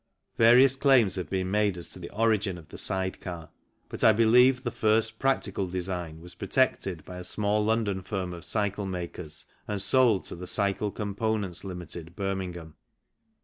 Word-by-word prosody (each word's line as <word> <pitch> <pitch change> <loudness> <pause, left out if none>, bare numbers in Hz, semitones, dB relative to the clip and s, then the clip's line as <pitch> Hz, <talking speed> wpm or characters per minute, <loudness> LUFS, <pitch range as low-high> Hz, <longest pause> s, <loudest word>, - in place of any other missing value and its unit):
Various 125 +4 +6
claims 130 -8 +4
have 90 -5 -4
been 95 -1 -2
made 105 -3 +1
as 85 - -4
to - - -11
the 85 - -8
origin 105 -3 +1
of 80 -2 -14
the - - -10
side 95 -1 -1
car, 85 -3 -8 0.4
but - - -6
I 110 - +8
believe 125 +4 +5
the 120 - -2
first 110 +1 +1
practical 100 -8 0
design 90 -3 -4
was 90 +1 -8
protected 100 -5 0
by 90 - -9
a - - -7
small 105 +3 0
London 105 -3 0
firm 95 -1 -4
of 85 - -9
cycle 100 -1 -1
makers 85 -4 -6 0.2
and 105 -1 -2
sold 115 0 +3
to - - -4
the 90 +1 -7
Cycle 100 +2 0
Components, 105 -2 -2
Ltd., 85 -2 -7
Birmingham. 95 -5 -4
100 Hz, 170 wpm, -27 LUFS, 90-110 Hz, 0.4 s, I